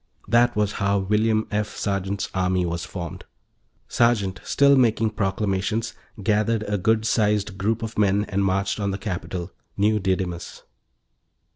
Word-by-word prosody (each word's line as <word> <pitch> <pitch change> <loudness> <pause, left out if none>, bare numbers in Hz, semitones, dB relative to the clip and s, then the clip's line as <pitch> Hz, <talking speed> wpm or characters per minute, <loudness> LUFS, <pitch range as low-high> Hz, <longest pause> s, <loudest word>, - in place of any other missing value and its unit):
That 120 +1 +3
was 105 -1 +1
how 100 0 +2
William 110 +3 +1
F. 105 0 -2
Sergeant's 100 0 -2
army 90 -1 +1
was 85 +1 -3
formed; 85 -2 -7 0.6
Sergeant, 105 -6 +1
still 140 0 +4
making 115 -4 +3
proclamations, 100 +1 -1 0.3
gathered 110 +2 +1
a 105 -1 -2
good 110 +3 +2
sized 105 -2 +1
group 110 +3 0
of 115 -1 -4
men 100 0 +3
and 100 0 0
marched 95 +2 0
on 100 -1 -1
the 95 - -2
capital, 90 -3 -5 0.3
New 105 +2 +2
Didymus. 95 -3 -3
105 Hz, 140 wpm, -24 LUFS, 95-110 Hz, 0.6 s, still